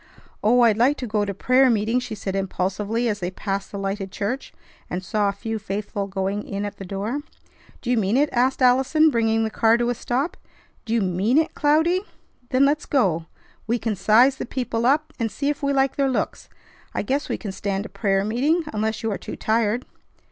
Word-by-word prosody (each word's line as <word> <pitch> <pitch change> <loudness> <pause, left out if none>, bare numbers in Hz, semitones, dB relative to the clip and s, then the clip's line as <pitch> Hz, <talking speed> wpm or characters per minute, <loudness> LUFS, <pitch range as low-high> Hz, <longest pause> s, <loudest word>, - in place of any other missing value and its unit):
"Oh! 240 +4 +5
I'd 225 -2 +4
like 270 +5 +4
to 255 - -4
go 210 -2 0
to 200 - -3
prayer 255 +5 +4
meeting!" 225 +2 +2
she 245 -3 -5
said 195 -2 -4
impulsively 195 +4 -1
as 210 -2 -1
they 175 -2 -2
passed 195 +1 -4
the 200 - -5
lighted 195 0 -3
church, 210 +8 -3 0.4
and 180 +1 -3
saw 205 +2 +1
a - - +1
few 220 +2 -4
faithful 200 0 -4
going 195 +1 -2
in 200 0 -4
at 205 0 -6
the 195 - -7
door. 205 +8 -3 0.6
"Do 245 - -1
you 245 - +3
mean 215 +2 +2
it?" 295 +2 +4
asked 255 +2 +2
Allison, 265 +5 +4
bringing 225 -2 +2
the 220 - -2
car 225 +1 +4
to 240 0 +1
a - - +1
stop. 255 +7 -2 0.5
"Do 225 - -2
you 230 - +2
mean 195 +7 +1
it, 320 0 +2
Cloudy? 320 +5 +2 0.5
Then 260 +2 +4
let's 295 +2 +1
go. 175 - +1 0.4
We 235 +2 +1
can 225 -2 -2
size 235 +8 +4
the - - -4
people 235 -2 -1
up, 300 +3 +2
and 225 -2 -1
see 280 +6 -1
if 295 - -2
we 280 0 +1
like 270 -1 +1
their 275 -1 +2
looks. 260 - -2 0.5
I - - 0
guess 275 +7 -1
we - - -1
can 205 - -5
stand 195 +1 -3
a - - -7
prayer 195 -2 0
meeting 280 +10 +1
unless 220 +1 -1
you 225 - 0
are 200 - -3
too - - -7
tired." 225 +2 0
225 Hz, 215 wpm, -23 LUFS, 200-255 Hz, 0.6 s, Oh